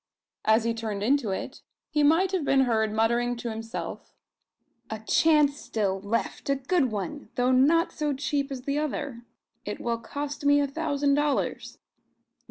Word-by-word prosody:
As 220 Hz, +1 st, +4 dB
he 230 Hz, 0 st, 0 dB
turned 215 Hz, -3 st, -4 dB
into 260 Hz, -1 st, +2 dB
it 190 Hz, -, -4 dB, 0.3 s
he 300 Hz, -2 st, +2 dB
might 325 Hz, +6 st, +4 dB
have 375 Hz, -5 st, 0 dB
been 275 Hz, -1 st, +3 dB
heard 220 Hz, -4 st, +1 dB
muttering 235 Hz, +3 st, +1 dB
to 235 Hz, -1 st, -4 dB
himself 225 Hz, +1 st, -6 dB, 0.7 s
"A 220 Hz, -, -3 dB
chance 290 Hz, +5 st, +3 dB
still 200 Hz, -8 st, -2 dB
left; 230 Hz, +6 st, -2 dB
a 275 Hz, -, +3 dB
good 270 Hz, -1 st, +1 dB
one, 220 Hz, +8 st, -5 dB
though 250 Hz, 0 st, +2 dB
not 305 Hz, +7 st, +4 dB
so 300 Hz, -1 st, -2 dB
cheap 280 Hz, 0 st, -1 dB
as 255 Hz, -2 st, -5 dB
the 280 Hz, +2 st, -1 dB
other. 285 Hz, -4 st, -3 dB, 0.4 s
It -, -, -5 dB
will 235 Hz, -1 st, -2 dB
cost 285 Hz, +4 st, -5 dB
me 285 Hz, 0 st, +5 dB
a 285 Hz, -, +2 dB
thousand 285 Hz, -1 st, 0 dB
dollars. 290 Hz, 0 st, -1 dB
270 Hz, 165 wpm, -27 LUFS, 230-290 Hz, 0.7 s, me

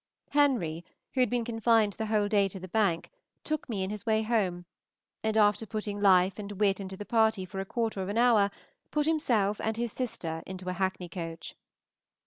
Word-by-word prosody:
Henry, 240 Hz, -, +2 dB, 0.3 s
who 265 Hz, -, -2 dB
had 250 Hz, -, +4 dB
been 240 Hz, -1 st, 0 dB
confined 225 Hz, -2 st, +2 dB
the 220 Hz, +2 st, -4 dB
whole 210 Hz, -1 st, +2 dB
day 205 Hz, -2 st, +3 dB
to 195 Hz, 0 st, -8 dB
the 185 Hz, -, -8 dB
bank, 190 Hz, -4 st, 0 dB, 0.3 s
took 310 Hz, -3 st, -3 dB
me 200 Hz, -5 st, -1 dB
in 190 Hz, -, -3 dB
his 210 Hz, -1 st, -6 dB
way 220 Hz, -1 st, +2 dB
home, 195 Hz, -6 st, 0 dB, 0.6 s
and, 220 Hz, 0 st, 0 dB
after 210 Hz, 0 st, +4 dB
putting 210 Hz, -2 st, -4 dB
life 190 Hz, 0 st, +4 dB
and 205 Hz, 0 st, -6 dB
wit 200 Hz, 0 st, +1 dB
into 190 Hz, -1 st, -6 dB
the 205 Hz, -, -7 dB
party 220 Hz, -4 st, +2 dB
for 190 Hz, +1 st, -7 dB
a 195 Hz, -, -3 dB
quarter 225 Hz, -1 st, -2 dB
of 190 Hz, -, -3 dB
an 205 Hz, -, -2 dB
hour, 230 Hz, -4 st, +5 dB, 0.4 s
put 300 Hz, -1 st, 0 dB
himself 235 Hz, -11 st, +1 dB
and 220 Hz, 0 st, -1 dB
his 235 Hz, -1 st, -2 dB
sister 165 Hz, -11 st, -4 dB
into 185 Hz, -1 st, -7 dB
a -, -, -1 dB
hackney 185 Hz, -1 st, -2 dB
coach. 165 Hz, -2 st, -6 dB
205 Hz, 200 wpm, -29 LUFS, 190-225 Hz, 0.6 s, hour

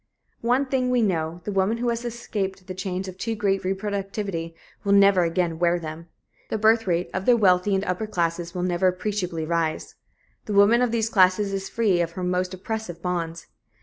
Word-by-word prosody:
One 250 Hz, +4 st, +2 dB
thing 260 Hz, -1 st, 0 dB
we 250 Hz, -2 st, +2 dB
know 170 Hz, -3 st, -1 dB
the 210 Hz, -, -4 dB
woman 195 Hz, +3 st, +1 dB
who 240 Hz, +1 st, -1 dB
has 235 Hz, 0 st, -2 dB
escaped 205 Hz, -5 st, -4 dB
the 185 Hz, -, -6 dB
chains 185 Hz, 0 st, -4 dB
of 185 Hz, 0 st, -9 dB
too 225 Hz, +2 st, -2 dB
great 195 Hz, -2 st, 0 dB
reproductivity 195 Hz, -3 st, -3 dB, 0.3 s
will 200 Hz, -, +2 dB
never 200 Hz, -2 st, +6 dB
again 165 Hz, -1 st, 0 dB
wear 175 Hz, 0 st, +3 dB
them. 165 Hz, 0 st, -7 dB, 0.4 s
The -, -, -1 dB
birth 220 Hz, 0 st, +3 dB
rate 175 Hz, 0 st, 0 dB
of 190 Hz, 0 st, -3 dB
the 245 Hz, -1 st, +6 dB
wealthy 195 Hz, -1 st, +3 dB
and 190 Hz, -, 0 dB
upper 185 Hz, +4 st, -2 dB
classes 170 Hz, -2 st, -2 dB
will 180 Hz, -, -2 dB
never 180 Hz, 0 st, +1 dB
appreciably 180 Hz, -3 st, -2 dB
rise. 165 Hz, -1 st, -1 dB, 0.5 s
The 210 Hz, -, -3 dB
woman 205 Hz, +4 st, +5 dB
of 250 Hz, -, +2 dB
these 225 Hz, -1 st, 0 dB
classes 195 Hz, -1 st, +3 dB
is 195 Hz, 0 st, -3 dB
free 205 Hz, -7 st, +2 dB
of 170 Hz, -1 st, -2 dB
her 185 Hz, -, -5 dB
most 180 Hz, 0 st, 0 dB
oppressive 190 Hz, -2 st, -5 dB
bonds. 170 Hz, -2 st, -3 dB
190 Hz, 195 wpm, -24 LUFS, 175-215 Hz, 0.5 s, never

